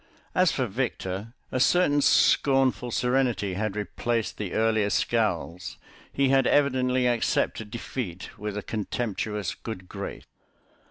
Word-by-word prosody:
As 185 -2 +4
for 130 - 0
Victor, 110 -3 -3 0.2
a 130 - -1
certain 145 0 +4
scornful 135 -3 +3
serenity 125 -5 +1
had 105 +1 -2
replaced 115 +2 -2
the 100 -4 -4
earlier 110 -2 +2
scowls; 90 -7 -1 0.3
he 135 -1 +2
had 135 -1 +4
evidently 130 -3 +2
accepted 115 -2 0
defeat 110 -5 -6
with 105 0 -5
a 105 - -4
contemptuous 105 -2 -3
good 95 -5 -8
grace. 100 +1 -6
115 Hz, 120 wpm, -26 LUFS, 105-130 Hz, 0.3 s, As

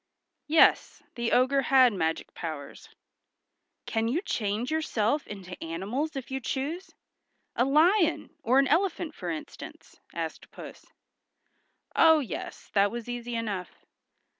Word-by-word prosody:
Yes, 315 +1 +4
the 235 -1 -2
ogre 265 +2 +3
had 260 -3 +5
magic 165 -4 -2
powers. 155 -4 -7 1.0
"Can 225 0 -1
you 305 - -1
change 220 - -2
yourself 290 -4 0
into 185 -3 -8
animals 205 - -3
if 265 -1 -6
you 265 - -2
choose? 295 +9 -4 0.7
A 245 - +2
lion 330 +5 +3
or 255 +3 +2
an 275 0 +5
elephant 335 +1 0
for 180 - -6
instance?" 160 -2 -8
asked - - -5
Puss. - - -11 1.1
Oh, 320 -1 +7
yes, 280 -6 -6
that 200 0 +4
was 235 +1 -6
easy 240 0 -5
enough. 205 -6 -5
245 Hz, 125 wpm, -28 LUFS, 205-300 Hz, 1.1 s, Oh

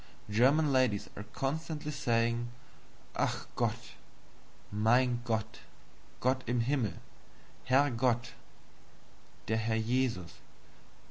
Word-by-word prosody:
German 140 +7 +4
ladies 125 -6 +2
are 105 - -7
constantly 150 +2 -3
saying, 115 -3 +1 0.7
"Ach! - - 0
Gott!" - - -1 0.8
"Mein 120 +4 +3
Gott!" 110 -2 -2 0.6
"Gott 130 +1 +1
in 120 0 +1
Himmel!" 120 - 0 0.7
"Herr 135 +2 +4
Gott" 120 0 +1 1.1
"Der 110 - +1
Herr 110 0 0
Jesus!" 115 -6 0
120 Hz, 90 wpm, -32 LUFS, 110-130 Hz, 1.1 s, German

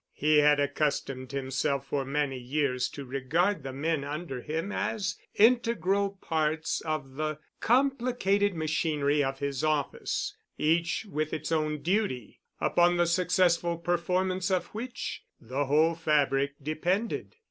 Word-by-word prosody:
He 150 +1 +3
had 150 0 +5
accustomed 140 -2 -1
himself 135 0 -1
for 135 0 -2
many 140 -1 -1
years 130 0 0
to 140 - -8
regard 150 +9 0
the 135 0 -5
men 150 +2 -1
under 145 -2 -5
him 160 +8 -3
as 195 -5 -1 0.2
integral 200 -4 +3
parts 155 0 0
of 140 -4 -4
the 155 -1 -1 0.2
complicated 240 -6 +2
machinery 150 -2 +1
of 135 0 -2
his 140 -1 -3
office, 155 -2 -1 0.2
each 165 +6 +1
with 155 -4 -2
its 160 - -3
own 155 -2 0
duty, 180 - -1 0.2
upon 175 0 +3
the 175 - +4
successful 175 -1 +2
performance 180 +2 0
of 185 -2 +1
which 240 +3 -5 0.2
the 130 +5 -2
whole 155 +4 +4
fabric 145 -3 +1
depended. 175 - -2
155 Hz, 130 wpm, -29 LUFS, 140-180 Hz, 0.2 s, had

